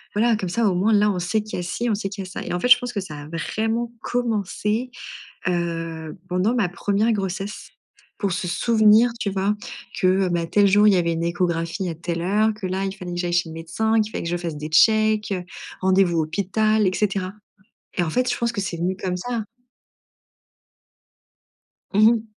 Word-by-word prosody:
voilà, 230 +1 +3
comme 185 -4 -3
ça 230 +4 +1
au 180 - 0
moins 205 +5 +2
là, 210 0 +4
on 180 - -2
sait 180 +5 0
qu'il 215 - -6
y - - -2
a - - -3
si, 235 +7 -2
on 210 - +2
sait 195 -1 -3
qu'il 195 -1 -6
y - - -8
a - - -11
ça» - - -5
et - - -5
en 175 - -1
fait, 250 - 0
je 240 - +10
pense 245 0 -4
que 205 - -1
ça 150 -6 -8
a 145 - -10
vraiment 225 +7 -2
commencé, 225 0 -1 0.6
heu, 165 -1 -3
pendant 185 +7 +1
ma 200 -7 +1
première - - -18 0.4
1re - - +3
grossesse 195 0 -4 0.5
pour 200 -3 0
se 180 -1 -2
souvenir, 220 +4 +4
tu 200 - -1
vois? 195 +2 0 0.5
Que, 185 +1 +3
bah, 170 -1 0
tel 200 +3 +4
jour, 205 +2 +5
il 205 - +6
y - - +4
avait 170 -1 +1
une 165 +1 -2
échographie 170 +1 -1
à 165 - -4
telle 170 0 -3
heure, 210 +4 +2
que 210 -3 -5
là, 190 +1 -2
il 195 - -2
fallait 180 -3 -7
que - - -4
j'aille 175 -1 -1
chez 175 -1 +2
le - - -8
médecin, 180 +8 -1
qu'il 215 +1 -3
fallait - - -4
que - - -2
je 175 - 0
fasse 165 -3 -5
des 150 +1 -5
checks, 215 +4 +4
heu, 180 -2 -2 0.4
rendez-vous 185 -3 +3
hôpital 200 +6 +1
et 185 - +1
cetera 195 -2 -1 0.7
et - - +4
en 160 - -2
fait, 250 +5 +1
je - - 0
pense 235 0 0
que 205 - -3
c'est 190 -3 -3
venu 180 +3 0
comme 180 -1 -3
ça. 230 +2 -3 2.4
Mmh 215 +3 +6
mh. 230 -2 +1
195 Hz, 225 wpm, -23 LUFS, 175-215 Hz, 2.4 s, je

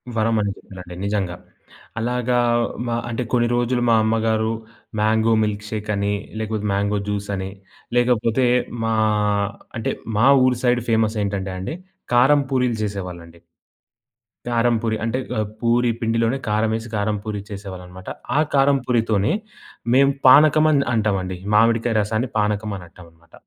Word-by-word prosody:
వరమని 110 -2 +1
చెప్పిరండి 90 -2 -11
నిజంగా. 100 -4 -1 0.6
అలాగా 125 +1 0 0.5
మా 115 - -1
అంటే, 120 +2 -2
కొన్ని 120 -1 +3
రోజులు 120 +1 0
మా 115 - +5
అమ్మగారు 110 0 +1 0.5
మ్యాంగో 110 +1 +3
మిల్క్‌షేక్ 105 0 -4
అని, 100 0 0 0.3
లేకపోతే 110 -1 -2
మ్యాంగో 100 +1 0
జ్యూస్ 105 0 -3
అని, 95 0 -4 0.5
లేకపోతే 120 0 +2 0.4
మా 115 - +1 0.8
అంటే, 115 - -2 0.2
మా 115 +5 +4 0.2
ఊరి 125 -1 +1
సైడు 120 -1 +2
ఫేమసేంటంటే 105 -4 0
అండి, 95 - -4 0.4
కారం 140 +4 +5
పూరీలు 125 -3 +1
చేసేవాళ్ళండి. 90 -5 -6 1.1
కారం 120 0 +2
పూరి 110 -1 0
అంటే, 115 +3 -1 0.2
అహ్, 110 - 0
పూరి 120 +1 +2
పిండిలోనే 115 +2 +1
కారమేసి, 110 +2 0
కారం 105 0 0
పూరి 105 -2 -4
చేసేవాళ్ళన్నమాట. 95 -2 -8 0.3
ఆ - - +5 0.2
కారం 140 0 +4
పూరితోనే 110 -4 +1 0.6
మేం 140 +1 +5 0.2
పానకమని 150 +1 +6
అంటామండి, 95 -5 0 0.2
మామిడికాయ 115 +1 +3
రసాన్ని 110 +4 -1
పానకం 105 0 0
అనంటామన్నమాట. 85 -1 -16
110 Hz, 125 wpm, -21 LUFS, 100-120 Hz, 1.1 s, పానకమని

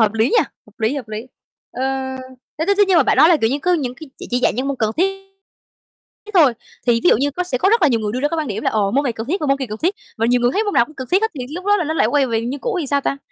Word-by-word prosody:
hợp 215 -2 +3
lý 220 0 +2
nhỉ? - - +3 0.3
Hợp 210 +1 -22
lý, 220 +5 +1
hợp 270 -6 -6
lý, 215 +3 -6 0.4
ơ, 255 - -5 0.8
thế 320 - 0
thế 400 - +3
thế 410 - +7
nhưng 370 - +4
mà 320 - +6
bạn - - +1
nói 315 - +7
là, 345 - +5
kiểu 225 - +2
như, 280 - 0
cứ 360 - +2
những 255 -6 -2
cái 310 +4 -12
chỉ - - -8
chỉ 245 - +1
dạy - - +2
những 265 +2 -1
môn 280 - -2
cần 220 -3 0
thiết 390 +2 0 1.0
thiết - - -9
thôi, 305 -9 +6 0.3
thì 235 -1 +3
ví 175 - +6
dụ - - +5
như 280 +5 0
có 360 +6 -3
sẽ 265 -8 -2
có 380 - +2
rất 455 0 +3
là 305 - +6
nhiều 235 -4 +1
người 210 -1 -3
đưa 250 - -2
ra 290 - +1
cái 330 - -3
quan 305 -3 -2
điểm 215 0 -4
là - - +1
ồ, 205 -2 +1
môn 275 +6 +1
này 250 - 0
cần 225 0 -6
thiết 365 +9 -1
và 300 - -1
môn 275 0 +2
kia 265 - -3
cần 215 +1 -6
thiết, 360 +5 +1 0.2
và 225 - +1
nhiều 245 +1 +2
người 240 0 +3
thấy 425 +7 0
môn 410 - -2
nào 235 - +5
cũng 310 - -16
cần 260 -3 -7
thiết 380 +4 +3
hết 445 - +1
thì 250 - -4
lúc 360 +2 -6
đó 410 +1 +3
là 355 - -1
nó 315 +1 -2
lại - - +3
quay 285 -2 +2
về 225 -2 -1
như 255 +4 -4
cũ 475 -1 -3
thì 305 - -3
sao 280 +1 +1
ta? 275 - -2
275 Hz, 360 wpm, -19 LUFS, 235-345 Hz, 1.0 s, thế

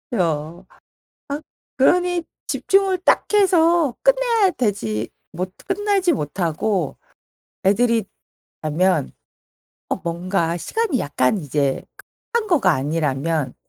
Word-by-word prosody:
요. 165 -1 -1 0.6
아 285 +1 -3 0.4
그러니 355 +5 +3 0.2
집중을 390 -1 +2
딱 - - +4
해서 340 - +4
끝내야 - - +3
되지 115 - -1 0.2
못 185 +2 -4
끝내지 395 -2 +1
못하고 170 - -1 0.7
애들이 225 +2 +3 0.6
자면 155 - +1 0.8
어 - - 0
뭔가 170 -1 -1
시간이 425 - -1
약간 140 +5 +1
이제 140 -3 -1 0.5
끝난 460 -2 0
거가 270 - +4
아니라면 150 0 -1
190 Hz, 200 characters per minute, -21 LUFS, -, 0.8 s, 딱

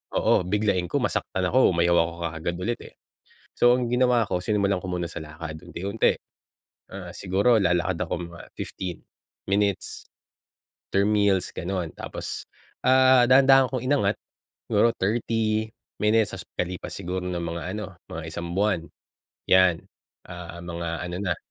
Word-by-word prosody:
oo, - - +3
biglain 100 -3 +1
ko - - +2
masaktan 95 -1 -1
ako, 130 +3 +4
umayaw 85 +1 +3
ako 85 0 +1 0.2
kaagad 80 +2 -4
ulit 115 +6 -2
eh. - - -13 0.6
So 120 0 +5
ang 125 -1 -1
ginawa 125 -2 +3
ko, 90 - 0
sinimulan 100 -2 +1
ko 95 - -7
muna 90 -1 -1
sa 80 - -7
lakad 80 0 -8
unti-unti. 100 +6 0 0.8
Ah, 90 -2 -7
siguro 100 +5 +2
lalakad 90 -2 +1
ako - - -3 0.2
mga 85 - -11 0.2
15 90 -3 -5 0.5
minutes 100 -1 0 0.8
after 100 0 +2
meals 100 -3 +2
ganon. 90 -2 -3
Tapos, - - -6 0.4
ah, 130 0 +6
dahan-dahan 135 0 +6
kong 130 -2 -3
inangat, 130 -7 +2 0.5
siguro 105 +3 +3
30 110 +1 0 0.3
minutes 105 0 +3
tas - - -5
pagkalipas 90 0 -5
siguro 95 -1 -3
ng 90 - -2
mga 85 0 -4
ano, 105 -2 -6 0.2
mga 85 - -6
1 85 +1 -5
buwan, 100 -5 +1 0.6
yan. 95 -3 +5 0.4
Ah 85 -1 -8
mga 85 0 -5 0.2
ano 90 - -5
na 90 -3 0
95 Hz, 145 wpm, -25 LUFS, 85-110 Hz, 0.8 s, ah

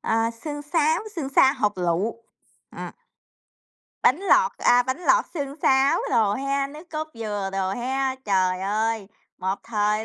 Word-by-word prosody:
à, 225 +1 +1
sương 290 +5 -7
sáo, 315 +1 +1 0.2
sương 280 -5 -3
sa 270 0 +5
hột 210 -8 -1
lựu. 185 +7 -1 0.5
Ờ. - - -7 1.1
Bánh 275 - +4
lọt, 475 +5 +4
à, 245 0 +5
bánh 260 +5 -3
lọt - - +3
xương 280 -3 -4
sáo 270 +4 +4
đồ 210 -2 +3
ha, 275 +2 -1
nước 305 +5 -12
cốt 310 0 -4
dừa 205 -3 -3
đồ 190 -1 -1
ha. 260 +5 -1
Trời 185 -2 +1
ơi, 215 +1 -1 0.3
một 190 +1 -1
thời 210 -1 0
245 Hz, 155 wpm, -24 LUFS, 205-285 Hz, 1.1 s, sa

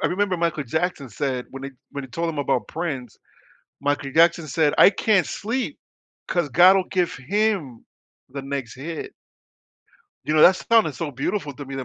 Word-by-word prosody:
I - - +3
remember 190 0 0
Michael 165 -3 -1
Jackson 160 0 -2
said 125 +3 -3
when 135 0 -9
he 140 - -5 0.2
when 140 -1 -6
he - - -11
told 165 +7 -3
him 155 - -4
about 125 -6 0
Prince, 145 -8 -5 0.7
Michael 145 -1 -1
Jackson 170 +1 +3
said, 150 +1 +1
"I - - +8
can't 200 -1 +2
sleep 255 +6 -3 0.5
'cause 175 -5 0
God 180 +8 +7
will 190 - +2
give 180 -2 0
him 190 - -1 0.4
the 140 +1 -6
next 135 -3 -5
hit." 155 +5 -6 1.1
You 155 - -1
know, 155 - +5
that 185 +1 +7
sounded 225 -11 +2
so 165 0 -4
beautiful 145 +4 -3
to 145 - -8
me 135 0 -8
that 130 - -4
155 Hz, 180 wpm, -23 LUFS, 135-180 Hz, 1.1 s, I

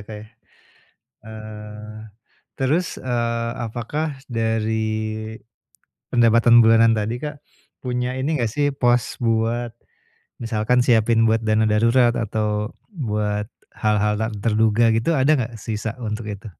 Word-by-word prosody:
Kak, 105 +2 -9
ya. 105 +1 -10 1.0
Eee, 105 0 -9 0.6
terus, 155 +7 0
eee, 115 -2 -1
apakah 130 +6 -3
dari 110 -2 -1 1.3
pendapatan 115 0 +5
bulanan 115 0 +5
tadi, 110 +4 -2
Kak, 150 -1 -5 0.4
punya 125 0 -3
ini 140 +1 -1
nggak 115 - 0
sih, 145 +3 0
pos 120 -2 0
buat 115 +1 0 0.7
misalkan 115 +2 +1
siapin 115 -1 +4
buat 115 0 +2
dana 110 0 +2
darurat 115 +3 +3
atau 105 -1 -1 0.2
buat 105 - -2 0.2
hal-hal 105 -1 +1
tak 110 - -1
terduga 110 +1 +2
gitu, 135 +7 +1
ada 145 +4 +4
nggak 120 -4 -2
sisa 110 +2 -4
untuk 110 -2 -4
itu? 105 +1 -8
115 Hz, 120 wpm, -22 LUFS, 110-120 Hz, 1.3 s, pendapatan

